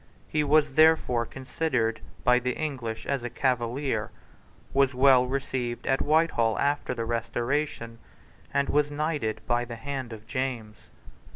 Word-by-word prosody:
He 150 Hz, -1 st, 0 dB
was 150 Hz, -1 st, +3 dB
therefore 155 Hz, -7 st, +4 dB
considered 130 Hz, -4 st, -2 dB, 0.2 s
by 125 Hz, 0 st, +5 dB
the 125 Hz, 0 st, -1 dB
English 130 Hz, -8 st, -4 dB
as 140 Hz, -2 st, -1 dB
a 120 Hz, -, -4 dB
Cavalier, 125 Hz, -1 st, -1 dB, 0.6 s
was 135 Hz, -1 st, +3 dB
well 130 Hz, -1 st, +5 dB
received 130 Hz, -2 st, -3 dB
at 135 Hz, -, +1 dB
Whitehall 150 Hz, -8 st, +2 dB
after 145 Hz, -2 st, 0 dB
the 115 Hz, -1 st, -3 dB
Restoration, 115 Hz, +1 st, -2 dB, 0.5 s
and 140 Hz, 0 st, +1 dB
was 145 Hz, 0 st, +2 dB
knighted 145 Hz, -6 st, -2 dB
by 120 Hz, 0 st, +1 dB
the 120 Hz, -1 st, -7 dB
hand 130 Hz, 0 st, -5 dB
of 110 Hz, -1 st, -9 dB
James. 120 Hz, -4 st, -3 dB
130 Hz, 135 wpm, -27 LUFS, 115-140 Hz, 0.6 s, by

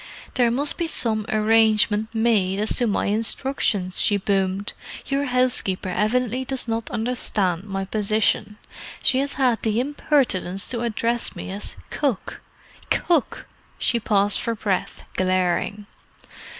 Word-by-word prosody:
"There 245 Hz, -2 st, +3 dB
must 280 Hz, +8 st, -1 dB
be 340 Hz, -, 0 dB
some 220 Hz, -7 st, +1 dB
arrangement 215 Hz, -1 st, +3 dB
made 220 Hz, -5 st, +2 dB
as 215 Hz, -, 0 dB
to 240 Hz, -, +2 dB
my 205 Hz, -, 0 dB
instructions," 210 Hz, -3 st, 0 dB
she 205 Hz, -, +3 dB
boomed. 195 Hz, 0 st, -1 dB, 0.3 s
"Your 280 Hz, +1 st, 0 dB
housekeeper 250 Hz, -8 st, 0 dB
evidently 240 Hz, +6 st, 0 dB
does 260 Hz, -1 st, -3 dB
not 225 Hz, 0 st, -2 dB
understand 210 Hz, -6 st, -1 dB
my 195 Hz, -1 st, -3 dB
position. 210 Hz, +1 st, +1 dB, 0.5 s
She 260 Hz, -, +4 dB
has 280 Hz, +1 st, -1 dB
had 255 Hz, -4 st, +1 dB
the 220 Hz, 0 st, 0 dB
impertinence 250 Hz, -, 0 dB
to 235 Hz, -3 st, -2 dB
address 235 Hz, 0 st, -1 dB
me -, -, -6 dB
as 200 Hz, +2 st, -6 dB, 0.2 s
'Cook.' 270 Hz, -10 st, -2 dB, 0.5 s
Cook!" 335 Hz, -7 st, +1 dB, 0.3 s
She 235 Hz, -, +1 dB
paused 205 Hz, -2 st, +2 dB
for 230 Hz, -, -2 dB
breath, 200 Hz, -4 st, -2 dB
glaring. 185 Hz, +2 st, 0 dB
220 Hz, 130 wpm, -23 LUFS, 200-250 Hz, 0.5 s, She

